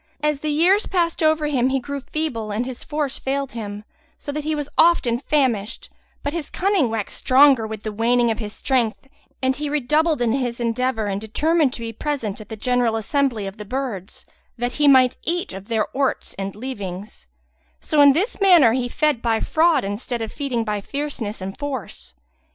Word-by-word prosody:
As 300 -2 +1
the 305 - -3
years 355 +8 +3
passed 340 -3 0
over 310 -1 +3
him, 260 -4 +1
he 270 0 +1
grew 280 +2 -5
feeble 275 -6 -3
and 215 +4 -2
his 255 -1 -7
force 295 -2 -3
failed 275 0 -2
him, 210 -2 -6 0.3
so 285 - -6
that 300 +1 -4
he 310 +1 -1
was 295 -2 -3
often 255 -9 +4
famished; 250 -8 -1 0.3
but 285 - -2
his 335 -4 -4
cunning 380 - +1
waxed 220 -2 -4
stronger 260 -3 +5
with 220 -1 -7
the 215 - -3
waning 235 +2 +2
of 220 - -3
his 210 -2 -5
strength 250 0 -1 0.4
and 260 0 +2
redoubled 300 +2 +1
in 240 -2 +1
his 245 -2 -1
endeavour 235 -1 0
and 200 0 -2
determined 300 +6 +1
to - - -7
be 230 0 -5
present 230 -6 -3
at 215 - -13
the 220 - -5
general 245 0 +1
assembly 230 -1 0
of 195 +2 -7
the 210 - -7
birds, 220 -4 -5 0.3
that 245 +1 -1
he 295 - +5
might 260 -2 +5
eat 345 - -2
of 195 +1 -9
their 225 -2 +1
orts 270 0 -1
and 195 0 -5
leavings; 205 - -7 0.5
so 300 -2 +2
in 285 -1 +8
this 400 - -1
manner 345 - +6
he 245 -1 -1
fed 300 -3 +1
by 225 -2 +1
fraud 330 +1 +2
instead 215 +4 -3
of 220 - -5
feeding 260 -5 -2
by 210 -2 -2
fierceness 255 -5 -5
and 195 +5 -6
force. 225 - -6
255 Hz, 190 wpm, -22 LUFS, 220-295 Hz, 0.5 s, in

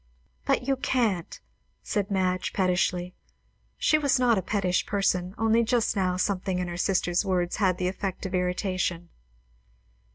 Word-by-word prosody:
"But 250 - +1
you 270 -1 +2
can't!" 225 -10 -1 0.4
said 200 -2 -2
Madge 185 -2 0
pettishly. 180 -1 0 0.6
She 310 - +3
was 285 -2 +2
not 245 -2 +3
a 190 - 0
pettish 185 -2 0
person, 185 -2 0
only 225 +1 +3
just 230 0 +1
now 185 -2 0
something 185 -1 -1
in 180 -1 -2
her 175 - -5
sister's 180 -1 +1
words 180 -2 -1
had 185 -3 +2
the 180 - -1
effect 190 0 -4
of 190 - -5
irritation. 180 -1 -1
185 Hz, 150 wpm, -27 LUFS, 180-210 Hz, 0.6 s, She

